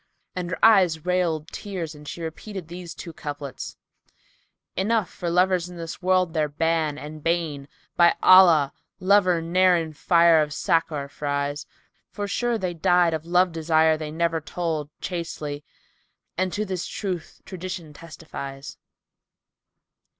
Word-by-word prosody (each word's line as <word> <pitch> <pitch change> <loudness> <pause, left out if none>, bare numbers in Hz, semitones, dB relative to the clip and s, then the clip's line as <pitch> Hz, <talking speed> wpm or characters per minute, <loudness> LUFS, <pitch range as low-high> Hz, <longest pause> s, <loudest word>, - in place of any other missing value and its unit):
And 180 -1 -3
her 180 - +1
eyes 185 -8 +4
railed 175 -4 0
tears 180 -6 -5
and 150 0 -13
she 170 - -6
repeated 180 +2 -7
these 175 -1 -8
two 170 - -8
couplets, 145 -3 -7 1.0
"Enough 210 +1 +1
for 175 - -5
lovers 180 0 +2
in 180 - -10
this 165 +1 -7
world 185 -2 +2
their 155 -2 0
ban 160 0 0
and 150 +1 -8
bane: 160 -4 -1 0.2
* - - -39
By 170 0 +6
Allah, 170 -7 +7 0.3
lover 185 -3 +3
ne'er 180 +2 +4
in 160 -2 -3
fire 170 0 +4
of 150 -1 -2
Sakar 165 -5 0
fries: 145 0 -3 0.4
For, 205 0 -4
sure, 240 +3 0
they 185 -4 -2
died 175 0 +3
of 160 +1 -4
love 180 +1 +3
desire 160 -1 +3
they 155 -1 -5
never 165 +1 0
told 160 -2 -3
* - - -48
Chastely, 155 -5 -5 0.7
and 185 +1 0
to 210 +3 -2
this 185 -2 -4
truth 185 -6 -5
tradition 180 -4 -7
testifies." 145 -4 -9
170 Hz, 145 wpm, -24 LUFS, 155-180 Hz, 1.0 s, Allah